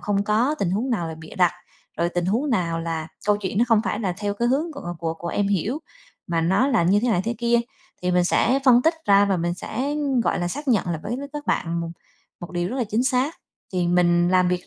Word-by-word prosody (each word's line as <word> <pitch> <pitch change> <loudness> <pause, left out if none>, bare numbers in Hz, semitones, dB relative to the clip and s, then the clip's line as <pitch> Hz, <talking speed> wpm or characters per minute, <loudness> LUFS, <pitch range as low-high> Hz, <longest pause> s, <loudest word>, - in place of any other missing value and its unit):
không 200 -1 0
có, 230 +8 +2
tình 180 -8 0
huống 230 +7 -1
nào 175 -8 -1
là 160 - -5
bịa 160 - -11
đặt, 180 -2 +4 0.5
rồi 170 - +2
tình 175 0 -2
huống 245 +9 0
nào 170 -7 0
là 165 -1 -3 0.2
câu 210 - +4
chuyện 200 -1 -3
nó 235 - +5
không 225 -2 +5
phải 210 - -2
là 185 -5 -1
theo 205 -1 -2
cái 235 +3 0
hướng 305 +6 0
của 175 -12 -6
của 165 -1 -2
của 170 +1 -6
em 200 +2 0
hiểu, 205 - 0 0.5
mà 170 -1 0
nó 190 +11 +2
là 235 -10 +3
như 190 +4 +4
thế 250 - +1
này 195 -6 +2
thế 235 +1 -1
kia. 235 0 +2 0.4
Thì 180 - +1
mình 180 0 +3
sẽ 250 +8 +2
phân 250 -2 +6
tích 320 +1 +3
ra 200 0 +6
và 195 -2 +1
mình 175 0 -1
sẽ, 260 +8 -4
ưm, 285 -4 0
gọi 225 - 0
là, 175 0 -1
xác 290 +8 -5
nhận 220 -7 +2
lại 165 -2 -1
với 240 - -3
l - - -6
các 295 0 -6
bạn 170 0 0
một 165 0 -4 0.5
một 175 - -8
điều 175 0 -1
rất 260 - -4
là 245 - 0
chính 220 +3 0
xác. 260 +5 +1 0.4
Thì 180 -2 0
mình 175 0 +3
làm 185 0 +3
việc 180 0 -2
200 Hz, 265 wpm, -23 LUFS, 175-240 Hz, 0.5 s, phân